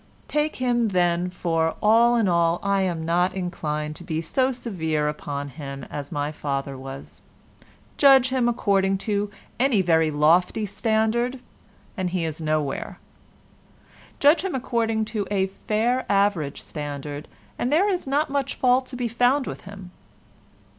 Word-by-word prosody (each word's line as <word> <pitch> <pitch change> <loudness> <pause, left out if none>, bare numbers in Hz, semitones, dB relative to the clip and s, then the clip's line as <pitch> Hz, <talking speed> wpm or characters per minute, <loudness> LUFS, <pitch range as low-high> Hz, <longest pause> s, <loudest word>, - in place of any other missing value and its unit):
Take 300 +1 0
him, 240 -2 +1
then, 175 -2 +1
for 165 -2 -1
all 230 +3 +5
in 225 -4 +2
all, 170 -1 +2
I 200 0 +2
am 170 -4 -1
not 180 +3 +1
inclined 155 -5 -3
to - - -11
be 160 -2 -2
so 255 +11 +1
severe 160 - -2
upon 145 -1 -4
him 140 -1 -8
as 145 -1 -6
my 145 +1 -2
father 140 -2 -3
was. 135 +1 -9 0.8
Judge 270 -3 +6
him 255 -2 +1
according 195 -4 +1
to 205 -1 0 0.3
any 245 -7 +3
very 160 -2 +3
lofty 170 +8 +3
standard, 225 +4 0 0.6
and 185 -4 -2
he 175 -2 -1
is 160 0 -5
nowhere. 155 -3 -2 1.2
Judge 295 +5 +5
him 385 -6 -2
according 230 -4 0
to 215 -3 -3
a 195 -2 +1 0.2
fair 235 +4 +1
average 195 -8 +1
standard, 145 -1 -6 0.3
and 245 - 0
there 345 +7 +4
is 365 -7 -1
not 285 +3 +1
much 280 -2 -1
fault 255 0 +2
to 255 - -7
be 245 -1 -1
found 245 +4 +2
with - - -7
him. 195 -2 -10
195 Hz, 150 wpm, -24 LUFS, 160-240 Hz, 1.2 s, Judge